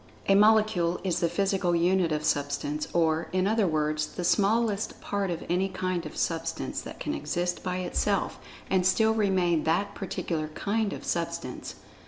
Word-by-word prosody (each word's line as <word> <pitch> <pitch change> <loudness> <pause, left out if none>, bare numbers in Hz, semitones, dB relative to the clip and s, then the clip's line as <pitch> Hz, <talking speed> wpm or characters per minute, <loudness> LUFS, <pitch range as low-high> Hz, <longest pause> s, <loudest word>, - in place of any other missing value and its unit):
A 195 - +5
"Molecule" 210 -4 +4
is 180 -3 0
the 170 - +1
physical 190 0 +1
unit 175 0 +2
of 150 0 -1
Substance, 145 +1 -1
or, 165 -1 +1
in 185 0 +1
other 215 -1 +2
words, 155 -1 0
the 180 - -6
smallest 210 +3 +1
part 200 -1 -2
of 170 -1 -3
any 185 +3 +1
kind 185 -3 -2
of - - -11
Substance 165 -1 -2
that - - -9
can - - -2
exist 175 0 -2
by 180 -1 -2
itself 190 +2 -1 0.3
and 190 -1 +2
still 220 +4 +3
remain 185 -6 +2
that 175 +6 +1
particular 165 -4 -3
"kind" 210 0 0
of - - -7
substance. - - -3
180 Hz, 165 wpm, -28 LUFS, 165-200 Hz, 0.3 s, A